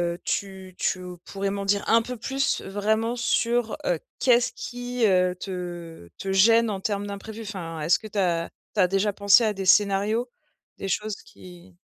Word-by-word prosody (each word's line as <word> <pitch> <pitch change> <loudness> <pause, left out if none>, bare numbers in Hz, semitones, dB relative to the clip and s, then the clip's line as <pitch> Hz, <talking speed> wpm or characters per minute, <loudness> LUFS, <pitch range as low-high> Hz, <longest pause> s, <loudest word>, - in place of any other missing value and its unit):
heu, - - -14
tu 190 -2 -4
tu 180 -1 -2
pourrais 195 0 -3
m'en 200 0 -3
dire 200 0 +2
un 230 0 +5
peu 250 +2 -5
plus 270 +4 -1
vraiment 220 +4 0
sur, 235 -1 0
heu, 170 -3 +1 0.2
qu'est-ce 245 -1 +3
qui, 245 -1 -3
heu, 180 -1 +3
te 175 - -7
te 195 - -4
gêne 225 +3 +5
en 195 -2 -3
termes 205 0 -2
d'imprévu? 215 +2 -7
Enfin, 170 -6 -6
est-ce 165 +3 +3
que 215 - -9
tu 205 -1 -3
as 170 -3 +1 0.3
tu - - -1
as 180 - +5
déjà 195 +2 +1
pensé 200 +3 +5
à 215 -1 +1
des 195 -1 -5
scénarios? 205 +4 +3 0.5
Des 195 - -5
choses 210 +1 -1
qui, 180 0 -15
200 Hz, 180 wpm, -25 LUFS, 185-220 Hz, 0.5 s, un